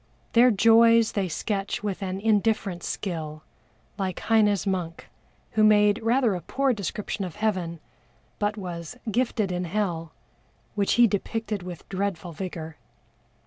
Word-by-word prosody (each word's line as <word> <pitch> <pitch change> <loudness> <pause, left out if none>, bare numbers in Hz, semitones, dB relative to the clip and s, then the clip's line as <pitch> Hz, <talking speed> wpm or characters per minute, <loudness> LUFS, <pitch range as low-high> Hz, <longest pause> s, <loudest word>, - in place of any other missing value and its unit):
Their 240 +2 +7
joys 230 +1 +5
they 195 -3 -1
sketch 200 +4 -3
with 205 -1 -3
an 190 0 -3
indifferent 210 -3 +1
skill, 155 -6 -4 0.6
like 190 -2 -2
HEINE'S 210 -3 +3
monk, 180 -4 -3 0.4
who 215 - +2
made 210 0 +5
rather 235 0 +2
a 180 - -4
poor 270 - 0
description 205 0 -4
of 180 -3 -6
Heaven, 185 -6 -1 0.6
but 210 +1 0
was 175 +1 -6
"gifted 225 -4 0
in 180 0 -2
Hell," 170 -4 -2 0.6
which 200 -1 +1
he 240 - +6
depicted 215 0 -2
with 175 -2 -9
dreadful 190 -3 -3
vigor. 160 -3 -6
200 Hz, 135 wpm, -26 LUFS, 180-220 Hz, 0.6 s, Their